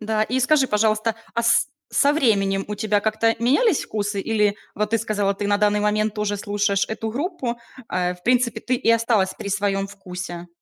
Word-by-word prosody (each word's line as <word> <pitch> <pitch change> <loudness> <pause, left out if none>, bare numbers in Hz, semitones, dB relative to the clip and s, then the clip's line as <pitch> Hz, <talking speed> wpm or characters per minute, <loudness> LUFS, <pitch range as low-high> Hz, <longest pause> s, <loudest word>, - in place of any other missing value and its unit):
Да. 215 0 0
И 250 +4 0
скажи, 270 +1 +3
пожалуйста, 215 0 +1 0.2
а 235 - 0
с 235 - +3 0.2
со 285 - +3
временем 200 -9 +1
у 210 - -4
тебя 210 0 +1
как-то 220 +1 +1
менялись 285 - +2
вкусы 205 -1 -2
или 210 -1 +1 0.2
вот 210 0 -1
ты 230 - +2
сказала, 205 -2 0
ты 200 +1 -3
на 205 0 +2
данный 210 0 +2
момент 215 0 0
тоже 210 -1 -1
слушаешь 205 -1 0
эту 220 0 -4
группу, 265 - -3 0.3
э, 180 0 -1
в 180 - -26
принципе, 245 -1 +2
ты 255 - -1
и 240 - +1
осталась 230 -4 +2
при - - -5
своём 195 -1 0
вкусе? 180 -3 -8
210 Hz, 190 wpm, -22 LUFS, 200-230 Hz, 0.3 s, скажи